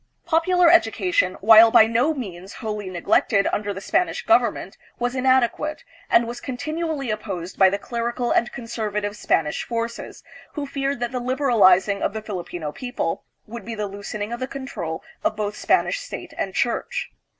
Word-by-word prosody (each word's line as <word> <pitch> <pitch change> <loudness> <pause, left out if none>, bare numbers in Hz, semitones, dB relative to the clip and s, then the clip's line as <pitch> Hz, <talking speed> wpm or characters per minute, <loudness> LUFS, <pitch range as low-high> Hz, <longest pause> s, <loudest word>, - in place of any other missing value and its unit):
Popular 350 +2 +3
education, 190 - +2
while 225 +2 +8
by 220 - +7
no 235 +7 +2
means 195 - -7
wholly 210 -3 -5
neglected 185 +3 +2
under 205 0 -1
the 195 - -5
Spanish 355 - -1
government, - - +2 0.2
was 245 0 -1
inadequate, 260 +3 +1 0.3
and 235 - +4
was 235 +1 -6
continu 310 +6 -4
ally 290 -4 -3
opposed 195 -5 -5
by 190 -1 +7
the 200 - -1
clerical 235 +2 -3
and 240 - +2
conservative 210 -3 -4
Spanish 155 -7 0
forces, 235 0 -5 0.3
who 295 -2 -4
feared 275 -1 -3
that 240 0 -1
the 255 - -2
liberalizing 220 -7 +3
of - - -1
the 220 - -4
Filipino 175 -6 -5
people 245 - -4 0.2
would 230 0 -8
be 225 +2 -6
the 210 -1 -2
loosening 205 +2 -5
of 240 - -5
the 255 - -3
control 260 -13 -6 0.2
of 215 - 0
both 210 -1 -3
Spanish - - +1
state - - -8
and - - -3
church. 485 0 -1
230 Hz, 165 wpm, -23 LUFS, 200-260 Hz, 0.3 s, while